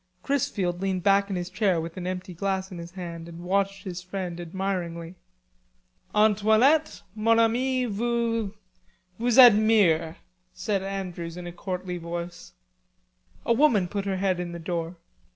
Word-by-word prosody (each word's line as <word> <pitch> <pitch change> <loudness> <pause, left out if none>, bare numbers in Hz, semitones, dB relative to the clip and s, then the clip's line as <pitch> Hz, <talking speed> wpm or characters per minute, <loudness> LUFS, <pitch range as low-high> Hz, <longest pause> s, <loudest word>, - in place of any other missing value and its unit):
Chrisfield 190 -10 -1
leaned 190 -2 -1
back 200 0 +3
in 195 - -2
his 180 0 -4
chair 185 -2 +1
with 165 +1 -6
an 180 -1 -5
empty 185 0 -5
glass 190 +1 -2
in 180 - -7
his 170 +1 -9
hand 170 -3 -7
and 170 +1 -10
watched 195 +1 0
his 180 -3 -6
friend 185 -2 -5
admiringly. 175 -1 -4 1.0
"Antoinette, 220 +7 +3
mon 225 +1 +2
ami 250 +3 +2
vous... 230 -1 -1 0.7
vous 240 +1 +1
admire," 210 -9 +6 0.4
said 195 +1 -1
Andrews 180 -3 -5
in 180 - -7
a 175 - -6
courtly 180 0 -5
voice. 170 +1 -7 0.9
A 235 - +3
woman 230 -8 +3
put 200 +2 -3
her 195 -1 -1
head 185 -1 0
in 175 -1 -4
the - - -5
door. 170 0 -3
190 Hz, 150 wpm, -26 LUFS, 175-215 Hz, 1.0 s, admire